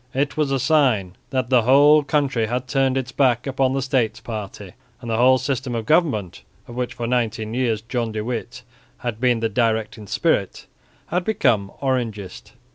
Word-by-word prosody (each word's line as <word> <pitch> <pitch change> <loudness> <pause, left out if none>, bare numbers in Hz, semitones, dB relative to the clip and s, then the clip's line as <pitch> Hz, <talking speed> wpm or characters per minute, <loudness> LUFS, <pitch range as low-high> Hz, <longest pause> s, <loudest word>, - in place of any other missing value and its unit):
It 140 +1 0
was 150 -3 0
a 135 - +1
sign 125 - +2
that 130 -1 -2
the 125 -2 +5
whole 145 +5 +6
country 135 -6 0
had 125 +2 -3
turned 135 -1 +1
its 130 -1 -3
back 125 -3 +2
upon 135 -1 0
the 135 -1 -1
States 130 -4 0
party 105 -3 -7 0.3
and 120 -2 -6
the 110 - 0
whole 130 +2 +5
system 130 -1 -3
of 115 -1 -3
government 140 - +1 0.3
of 120 - -10
which 125 0 -3
for 120 - -4
nineteen 115 -2 -1
years 120 -4 0
John 115 -1 -2
de 110 0 -3
Witt 120 +1 -5 0.4
had 115 -2 -3
been 125 -3 +2
the 115 - +1
directing 110 -1 -1
spirit, - - 0 0.4
and 175 - -1
had 180 - 0
become 120 - +1
Orangist. 115 -8 -3
125 Hz, 185 wpm, -22 LUFS, 110-135 Hz, 0.4 s, whole